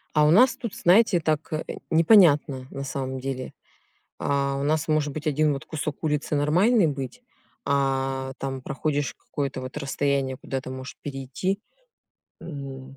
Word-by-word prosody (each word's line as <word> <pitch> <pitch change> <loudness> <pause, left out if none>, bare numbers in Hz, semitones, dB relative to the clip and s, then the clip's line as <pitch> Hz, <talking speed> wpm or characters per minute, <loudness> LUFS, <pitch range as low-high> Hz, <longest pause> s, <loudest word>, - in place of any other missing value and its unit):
А 150 0 +5
у 150 - +5
нас 245 +6 +6
тут, 235 -5 -5
знаете, 185 0 +4
так, 155 0 -1
э, 155 - -1 0.3
непонятно, 155 -7 +5
на 140 - -6
самом 130 0 -4
деле. 130 -1 -5 0.7
А, 140 -1 0
у - - -2
нас 155 +1 +1
может 155 -2 +1
быть 155 +1 -6
1 150 0 +2
вот 135 - -6
кусок 155 0 -5
улицы 150 0 0
нормальный 175 +7 +4
быть, 140 - -5 0.4
а, 135 -1 0
там, 135 -1 -4
проходишь 145 0 -2
какое-то 135 -2 -4
вот 130 +3 -7
расстояние 140 -2 -1
куда 135 -1 -4
ты 130 - -8
можешь 130 0 -7
перейти. 140 +8 -3 0.8
М, 135 -3 -8
140 Hz, 155 wpm, -25 LUFS, 135-155 Hz, 0.8 s, нас